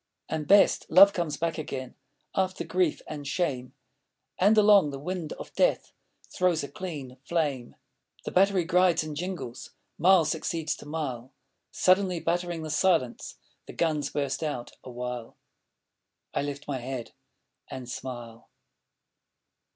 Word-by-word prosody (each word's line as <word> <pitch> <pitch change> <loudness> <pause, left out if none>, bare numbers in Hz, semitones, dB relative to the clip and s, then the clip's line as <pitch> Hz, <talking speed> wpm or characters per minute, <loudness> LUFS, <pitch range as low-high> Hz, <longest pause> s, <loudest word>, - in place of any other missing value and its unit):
And, 155 -2 -3
best! 200 +1 +5
Love 195 +4 +8
comes 170 -4 -2
back 165 0 -2
again 130 -4 -5 0.4
After 190 -1 -1
grief 180 -4 0
and 145 -2 -7
shame, 135 -5 -2 0.6
And 205 +4 +5
along 205 -6 +6
the 140 - -5
wind 165 +2 -4
of - - -10
death - - +1 0.4
Throws 180 -4 +2
a 140 - -5
clean 145 -9 -7
flame. 145 -7 -2 0.5
The - - -3
battery 195 -1 +3
grides 180 -1 +3
and 155 -1 -6
jingles, 175 -7 -6 0.2
Mile 180 0 +6
succeeds 160 +1 -2
to - - -12
mile; 135 -5 -4 0.4
Suddenly 185 -1 +2
battering 175 0 -2
the 155 - -4
silence 160 -7 +1 0.3
The - - -9
guns 150 -4 0
burst 140 -1 -2
out 145 -6 -3
awhile. 125 -2 -6 1.0
I - - 0
lift 145 0 -5
my 140 -3 -2
head 125 -1 -5 0.6
and 130 -2 -7
smile. 120 -2 -8
155 Hz, 135 wpm, -27 LUFS, 135-180 Hz, 1.0 s, Love